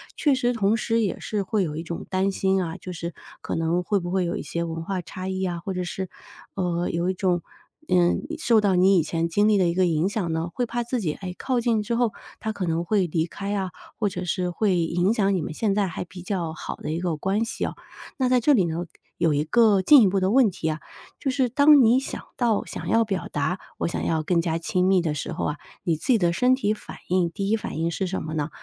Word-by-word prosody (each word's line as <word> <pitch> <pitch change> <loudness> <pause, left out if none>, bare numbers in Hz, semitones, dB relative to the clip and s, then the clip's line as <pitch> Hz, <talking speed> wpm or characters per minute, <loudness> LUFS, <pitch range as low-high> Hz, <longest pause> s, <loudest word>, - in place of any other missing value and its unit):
确 295 -4 +2
实 245 -2 +1
同 215 0 +2
时 230 +1 +1
也 200 - -1
是 210 -2 -2
会 200 0 0
有 150 - -4
一 160 - -4
种 170 0 -6
担 190 +1 +1
心 190 -1 +1
啊， 165 -1 -5
就 180 - -8
是 170 0 -5 0.3
可 - - -3
能 165 +2 0
会 200 +2 +1
不 175 0 -5
会 185 0 +1
有 170 - -2
一 - - -4
些 170 0 -3
文 165 0 -4
化 190 -2 -2
差 185 +1 -7
异 190 0 -2
啊， 175 -2 -2
或 190 +2 -4
者 180 - -2
是， 185 +1 -4 0.5
呃， 175 -2 -1
有 170 +2 0
一 - - +1
种， 180 -2 0 0.5
嗯， 175 -1 +3 0.2
受 230 -7 +4
到 195 -3 +2
你 190 +2 +5
以 165 - +3
前 165 +1 -1
经 205 +5 +2
历 210 - +4
的 185 -3 +3
一 170 - +1
个 185 +1 +3
影 165 0 +1
响 195 -5 -2
呢？ 160 +1 -2
会 245 - 0
怕 240 +1 -2
自 240 0 -2
己， 160 -6 -1
诶， 185 -2 -6
靠 255 -2 0
近 225 -3 +1
之 230 +3 -1
后， 235 -3 +1 0.3
他 220 - -2
可 195 -3 -3
能 165 +1 -1
会 195 -1 +2
离 160 0 0
开 200 +4 -4
啊， 190 -3 -2 0.3
或 210 - +2
者 180 0 -5
是 180 0 -1
会 185 0 +1
影 175 +4 +1
响 200 -3 +2
你 180 - 0
们 155 - -4
现 200 +4 0
在 205 -2 +2
还 175 - -5
比 180 +1 -11
较 175 -4 -3
好 165 - -6
的 - - -5
一 165 - -2
个 170 -4 -1
关 195 +7 0
系 225 - -3
哦。 - - -4 0.4
那 255 -2 +1
在 250 -1 +4
这 290 +5 +4
里 215 -8 +4
呢， 170 +1 -3 0.3
有 160 -3 +2
一 145 +1 +1
个 210 +2 +4
进 285 +7 +8
一 210 - +6
步 190 0 +1
的 190 +2 +2
问 250 -4 +5
题 160 -3 -3
啊， 155 -1 -2 0.4
就 275 - -1
是 260 -2 +1
当 285 +1 +6
你 235 +3 +5
想 270 - -5 0.2
到 230 -4 +2
想 - - -7
要 230 - +4
表 195 -4 -3
达， 155 +6 -1 0.2
我 - - 0
想 - - -3
要 160 -1 0
更 170 +1 +2
加 165 -1 0
亲 180 +2 0
密 190 -1 +4
的 160 -3 -1
时 150 - -4
候 - - -3
啊， 150 - -2 0.3
你 165 -3 +1
自 - - -8
己 250 -4 +5
的 175 -3 +2
身 250 +8 +3
体 215 -5 0
反 - - -10
应， 180 -2 +2
第 195 +2 -3
一 225 - +3
反 215 - -6
应 165 +1 0
是 190 +3 -2
什 190 +1 -3
么 155 0 -5
呢？ 155 0 -1
185 Hz, 285 characters per minute, -24 LUFS, 170-215 Hz, 0.5 s, 进